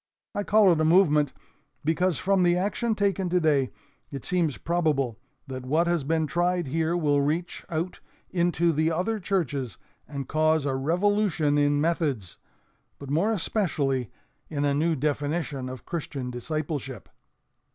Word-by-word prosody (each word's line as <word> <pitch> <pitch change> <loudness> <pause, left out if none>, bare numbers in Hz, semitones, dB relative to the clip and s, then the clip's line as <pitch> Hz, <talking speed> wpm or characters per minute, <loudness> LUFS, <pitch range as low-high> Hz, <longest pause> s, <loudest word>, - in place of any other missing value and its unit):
I 205 - -1
call 205 -2 +5
it 160 -2 +2
a - - +3
'movement' 155 -4 +4 0.5
because 170 +1 +1
from 195 0 +2
the 175 0 +4
action 215 +4 0
taken 195 -3 0
today, 155 -7 +2 0.4
it 140 -3 -7
seems 170 -6 0
probable 150 -9 0 0.3
that 130 -2 -6
what 155 +6 +2
has 170 -3 +1
been 160 +2 +1
tried 175 +2 0
here 160 +5 0
will 145 -4 +2
reach 160 +5 -2
out 170 +2 -3 0.3
into 170 -1 +2
the 155 +2 +1
other 185 +7 -1
churches 150 - -2 0.3
and 140 -2 -5
cause 155 -1 +2
a 135 - 0
revolution 165 +1 +1
in 145 0 +3
methods, 145 - -1 0.6
but 140 -1 -8
more 175 +9 +2
especially 150 - 0 0.4
in 145 -2 -1
a 140 - +2
new 160 +3 +1
definition 145 -1 -2
of 130 -1 -9
Christian 140 -6 -4
discipleship. 135 - -4
155 Hz, 145 wpm, -26 LUFS, 140-175 Hz, 0.6 s, call